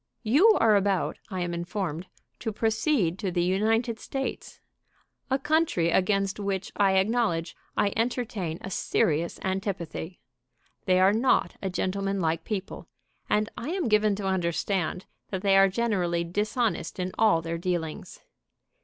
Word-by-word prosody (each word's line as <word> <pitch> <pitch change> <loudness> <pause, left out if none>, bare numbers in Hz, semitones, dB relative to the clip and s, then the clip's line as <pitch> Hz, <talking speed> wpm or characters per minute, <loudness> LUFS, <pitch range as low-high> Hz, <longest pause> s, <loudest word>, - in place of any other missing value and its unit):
"You 310 - +5
are 220 -2 +5
about, 195 -2 +1
I 185 -3 -3
am 175 0 -2
informed, 175 -1 -3 0.3
to 225 - -3
proceed 220 - +1
to 195 - -1
the 175 -1 0
United 220 +5 +1
States, 270 -1 -5 0.7
a 265 - +2
country 285 - +1
against 195 +2 +1
which 195 -2 -2
I 195 -1 +3
acknowledge 190 -4 +1 0.2
I 200 -1 +2
entertain 225 -7 -2
a 195 - -7
serious 165 -2 0
antipathy. 185 -3 -3 0.7
They 185 0 +3
are 190 +2 +5
not 240 +4 +2
a 195 - -2
gentlemanlike 185 -3 -1
people, 200 -3 -5 0.4
and 210 0 +2
I 250 - -5
am 360 -4 -1
given 210 -1 +3
to 200 0 -5
understand 180 0 -1 0.2
that 190 -1 -4
they 195 -1 +4
are 195 0 +6
generally 185 -6 0
dishonest 205 +1 -1
in 185 0 -2
all 210 -7 +4
their 165 0 -3
dealings. 170 -3 -4
195 Hz, 140 wpm, -27 LUFS, 175-220 Hz, 0.7 s, are